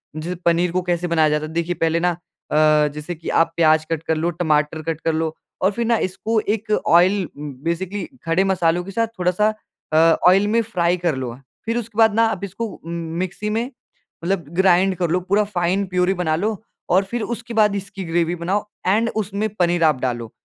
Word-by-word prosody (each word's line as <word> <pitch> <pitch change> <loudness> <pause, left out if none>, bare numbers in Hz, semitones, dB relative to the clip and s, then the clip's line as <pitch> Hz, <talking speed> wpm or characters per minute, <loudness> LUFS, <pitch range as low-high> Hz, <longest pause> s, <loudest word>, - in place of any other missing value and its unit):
जैसे 165 +4 -4
पनीर 170 +1 +3
को 185 +1 0
कैसे 175 0 -1
बनाया 160 -2 +3
जाता 150 0 0
है? 155 - -8
देखिए 170 +1 -1
पहले 165 +1 +2
ना 175 -1 0 0.4
अ, 150 0 +4
जैसे 150 +3 -5
कि 165 +1 -7
आप 165 0 +2
प्याज 155 -1 +4
कट 160 -2 -1
कर 160 - 0
लो, 160 +2 0
टमाटर 155 -2 0
कट 165 -1 -3
कर 165 - 0
लो 160 0 -1 0.3
और 190 - +3
फिर 235 +3 -2
ना 230 0 +3
इसको 220 +4 -1 0.2
एक 215 0 -8 0.2
ऑइल, 180 +2 +4
बेसिकली 170 +8 -4 0.2
खड़े 165 +4 +2
मसालों 175 -2 +1
के 195 - -8
साथ 230 +3 0
थोड़ा-सा 180 +4 +2 0.5
अ, - - +4 0.3
ऑइल 195 +3 +5
में 230 +2 +2
फ्राई 180 -5 0
कर 170 -4 0
लो। 125 -2 -5 0.3
फिर 230 +1 -1
उसके 230 -2 -6
बाद 220 -2 +5
ना 225 - +4
आप 200 -1 -5
इसको 200 +4 -4
उ 205 - -11
मिक्सी 170 +5 -3
में 225 +2 0 0.6
मतलब 175 -1 -1
ग्राइंड 190 0 +4
कर 175 -2 0
लो 180 - +2
पूरा 200 +4 +1
फाइन 190 0 0
प्यूरी 180 +1 +1
बना 175 -4 0
लो 210 +6 -1 0.3
और 185 +2 +4
फिर 240 - -2
उसके 235 +1 -9
बाद 210 -2 +3
इसकी 195 0 -6
ग्रेवी 170 +1 0
बनाओ 185 +4 -1 0.2
ऐंड 220 +4 +3
उसमें 210 0 -1
पनीर 175 -1 +2
आप 150 -5 +3
डालो। 120 -3 -3
180 Hz, 205 wpm, -21 LUFS, 165-200 Hz, 0.6 s, ऑइल